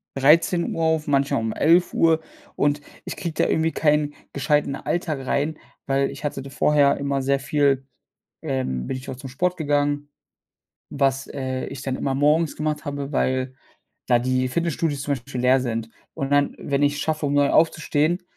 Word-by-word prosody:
13:00 165 +4 +3
auf, 160 -1 +1
manchmal 140 -1 +2
um 110 -1 -2
11:00 165 0 +3 0.4
und 145 0 +1 0.2
ich - - -5
kriege 170 -3 -4
da - - +1
irgendwie 160 0 +1
keinen 150 -1 +1 0.2
gescheiten 145 0 +1
Alltag 155 -4 -3
rein, 150 +4 0 0.3
weil 135 0 +1
ich 140 +1 -10
hatte 140 -2 -3
da 135 - -9
vorher 145 0 +3
immer 140 -1 -1
sehr 135 +1 +1
viel, 140 -2 +1 0.6
ähm 130 - -2
bin - - -3
ich 130 +1 -9
auch 130 - -4
zum 135 0 -8
Sport 180 +7 0
gegangen, 145 -1 0 0.8
was, 135 -1 0
äh, 130 -2 -4
ich 135 - -7
dann 130 -2 -2
immer 135 - -1
morgens 150 +3 +2
gemacht 150 0 -2
habe, 140 0 -4
weil 130 -1 0 0.5
da 120 -2 +4
die 130 +1 0
Fitnessstudios 160 -1 -1
zum 145 - -1
Beispiel 125 0 -6
leer 130 +1 +4
sind. 115 -3 -3 0.3
Und 135 0 -3
dann, 145 0 +2
wenn 140 0 -1
ich 145 0 +3
es 145 - -4
schaffe, 155 -1 -1
um 145 - 0
9 145 -1 +3
aufzustehen, 160 +1 +2
145 Hz, 175 wpm, -23 LUFS, 135-150 Hz, 0.8 s, da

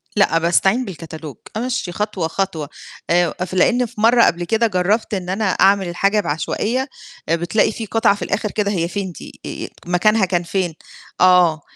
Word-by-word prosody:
لأ، 200 -5 +3
باستعين 190 +8 +2
بالكتالوج، 160 - -8 0.2
أمشِّي 245 -6 -2
خطوة، 200 -3 -2
خطوة، 165 -4 -3 0.4
آآ، 175 -1 +2
ف 185 - -10
لإن 245 +7 +3
في 225 -2 -8
مرّه 235 +1 +5
قبل 175 +1 +1
كده 225 +6 +1
جرّبت 205 +4 0
إن 185 -3 -3
أنا 205 +4 -1
أعمل 195 -1 +3
الحاجة 195 +4 +1
بعشوائية، 215 - -1 0.4
بتلاقي 175 +7 +2
في 225 +1 -6
قطعة 225 -1 +2
في 205 - -12
الآخِر 210 - -2
كده 205 -2 -1
هي 170 -4 0
فين 190 0 -4
دي، - - -12
آآ - - -6 0.2
مكانها 215 +3 +3
كان 175 -2 -1
فين؟ 175 0 -2 0.5
آه، 180 -4 +5
190 Hz, 170 wpm, -19 LUFS, 175-215 Hz, 0.5 s, مرّه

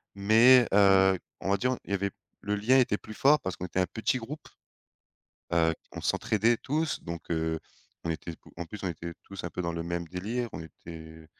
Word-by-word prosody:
mais 115 +5 +6
heu, 95 -1 +6 0.2
on 95 - -2
va 100 - +3
dire, 125 0 0
il - - -9
y - - +1
avait 100 0 -1 0.3
le 105 +1 -1
lien 120 +6 +4
était 120 -5 +2
plus 110 - -11
fort 150 +2 +5
parce 95 - -3
qu'on 90 - -5
était 90 - -2
un - - +2
petit 110 +3 -1
groupe, 145 +6 -8 1.0
heu, 80 -1 +3 0.2
on - - -6
s'entraidait 115 +2 +2
tous, 155 +3 -1
donc 85 -1 -7
heu, 80 -1 0 0.5
on 85 - -1
était 80 +1 -4 0.2
en 85 0 -5
plus, 105 - -8
on - - 0
était 85 0 -6
tous 100 -2 -8
un - - -3
peu 90 - -4
dans 85 - -2
le 85 0 -3
même 85 0 -3
délire. 110 +7 -3
On - - -6
était 80 0 -11
95 Hz, 210 wpm, -29 LUFS, 85-115 Hz, 1.0 s, mais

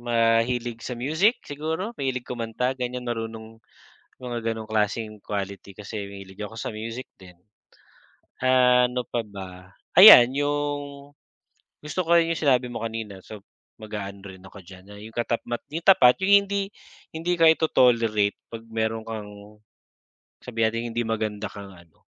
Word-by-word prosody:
mahilig 115 0 +1
sa 125 - -5
music 160 - +1
siguro, 160 +9 -4
mahilig 130 -2 -2
kumanta 120 +1 -2
ganyan, 125 -1 -4
marunong 115 -1 -6 0.6
mga 120 -2 -3
ganong 110 -1 -8
klaseng 110 0 -1
quality 100 -1 -5
kasi 105 0 -6
mahilig 95 0 -12
ako 110 +2 -8
sa - - -4
music 115 +4 -6
din. 90 -2 -16 1.1
Ah, 125 -1 +5
ano 125 0 -2
pa 115 -2 -3
ba 95 -2 -11 0.2
ayan 175 - +11
yung, 145 -1 -3 0.7
gusto 150 +5 -3
ko 170 0 +4
rin 165 0 +1
yung - - -6
sinabi 130 -4 +3
mo 120 -2 -6
kanina 110 -4 -6
so 110 - -10 0.4
mag-aano 100 -2 -7
rin 95 -1 -11
ako 95 +1 -13
diyan 95 0 -14
na 100 - -11
yung 110 +2 -12
katapmat 120 0 -3
yung 165 +3 -5
tapat 125 -10 +6
yung 200 +1 +5
hindi, 200 0 -3 0.4
hindi 175 +2 -2
ka 165 - +5
ito-tolerate 115 -10 +3 0.2
pag 115 0 -9
mayro'n 110 0 -3
kang 105 -1 -9 0.8
sabihin 115 -2 -1
na - - +1
nating 115 +1 -3
hindi 120 +1 -1
maganda 110 -1 -3
kang 100 0 -10
ano 85 -4 -19
115 Hz, 150 wpm, -24 LUFS, 105-130 Hz, 1.1 s, ayan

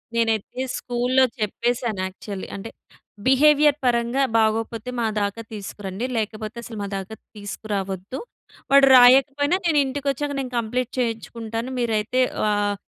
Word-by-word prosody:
నేనైతే 225 +1 0 0.2
స్కూల్లో 250 +2 +1 0.2
చెప్పేసాను 230 0 -1
యాక్చువల్లి. 190 +1 -7
అంటే 200 +3 -7 0.6
బిహేవియర్ 295 +2 +5
పరంగా 240 +2 +2
బాగోకపోతే 225 +1 0
మా 230 - +1 0.2
దాకా 200 +3 -2
తీసుకురండి. 200 +1 -5
లేకపోతే 215 0 -3
అసలు 225 -2 -8
మా 200 - -3
దాక 195 0 -5 0.3
తీసుకురావద్దు. 200 +1 -5 0.5
వాడు 275 0 +7
రాయకపోయినా 275 +6 +5
నేను 325 -3 +3
ఇంటికొచ్చాక 280 +1 -2
నేను 260 -2 -4
కంప్లీట్ 245 +2 -2
చేయించుకుంటాను. 230 0 -3
మీరైతే 230 +1 0 0.3
ఆహ్, 205 0 +1
230 Hz, 115 wpm, -23 LUFS, 210-255 Hz, 0.6 s, వాడు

